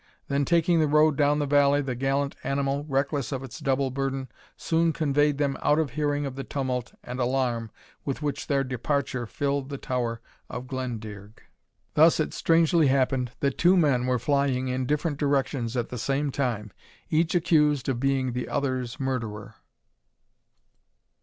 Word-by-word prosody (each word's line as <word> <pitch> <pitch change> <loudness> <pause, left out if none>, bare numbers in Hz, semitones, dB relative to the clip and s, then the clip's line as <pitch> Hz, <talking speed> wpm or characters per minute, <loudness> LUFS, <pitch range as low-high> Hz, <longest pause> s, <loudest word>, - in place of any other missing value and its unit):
Then 140 0 +1
taking 170 +1 +3
the 155 - +3
road 150 0 +4
down 145 +1 +3
the 145 - 0
valley, 145 0 +4
the 135 -3 -2
gallant 135 +3 -1
animal, 140 +1 -1
reckless 140 0 -1
of 135 -1 -3
its 130 -4 -8
double 135 0 0
burden, 135 0 -3 0.3
soon 165 0 +1
conveyed 145 -2 +2
them 140 -2 0
out 150 - +3
of 155 -5 0
hearing 145 0 -1
of 135 -2 -5
the 135 - -5
tumult 130 -4 -3
and 125 +1 -6
alarm 120 -3 0 0.3
with 140 - -3
which 145 -1 -3
their 140 -1 +2
departure 130 -1 -2
filled 140 +2 -2
the 140 - -4
Tower 120 -3 -2 0.3
of 125 +1 -6
Glendearg. 110 -5 -6 0.6
Thus 160 +2 +5
it 155 - -1
strangely 165 -1 +3
happened, 130 -2 +1
that 140 -1 0
two 180 +2 +5
men 135 -7 +2
were 125 0 +2
flying 130 0 0
in 130 0 -1
different 150 +1 -1
directions 135 -4 0
at 120 - -1
the 125 - -5
same 140 +4 0
time, 115 -7 -2 0.4
each 160 +2 +2
accused 150 -5 +3
of 130 -3 0
being 135 -1 0
the 125 0 -3
other's 130 -4 -2
murderer. 115 -6 -3
135 Hz, 165 wpm, -26 LUFS, 125-145 Hz, 0.6 s, Thus